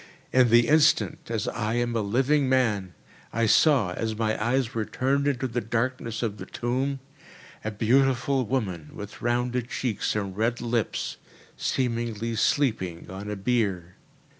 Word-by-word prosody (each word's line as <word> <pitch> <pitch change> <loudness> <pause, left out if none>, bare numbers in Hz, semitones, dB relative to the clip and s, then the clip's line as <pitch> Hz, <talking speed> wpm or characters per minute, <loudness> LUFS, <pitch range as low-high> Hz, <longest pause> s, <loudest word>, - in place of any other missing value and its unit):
In 130 -2 +5
the 120 +1 +5
instant, 155 -4 +3
as 110 -3 -2
I 110 0 -2
am 120 -1 0
a 115 - +1
living 130 +7 +2
man, 105 -8 +1 0.4
I 115 0 +1
saw, 110 - +4
as 110 +2 -3
my 110 -1 +1
eyes 125 +1 +1
were 115 - -1
turned 140 +5 0
into 130 -2 0
the 120 0 -2
darkness 115 +1 -2
of 105 -3 -2
the - - -8
tomb, 130 +3 -2 0.6
a 110 - -1
beautiful 130 +4 +2
woman, 100 - -2
with 105 0 -9
rounded 125 0 0
cheeks 120 -5 -1
and 100 -3 -2
red 115 +3 0
lips, 120 -3 -2 0.4
seemingly 115 -2 -1
sleeping 110 - 0
on 100 +2 -6
a 105 - -2
bier. 100 -5 -1
115 Hz, 150 wpm, -26 LUFS, 105-130 Hz, 0.6 s, In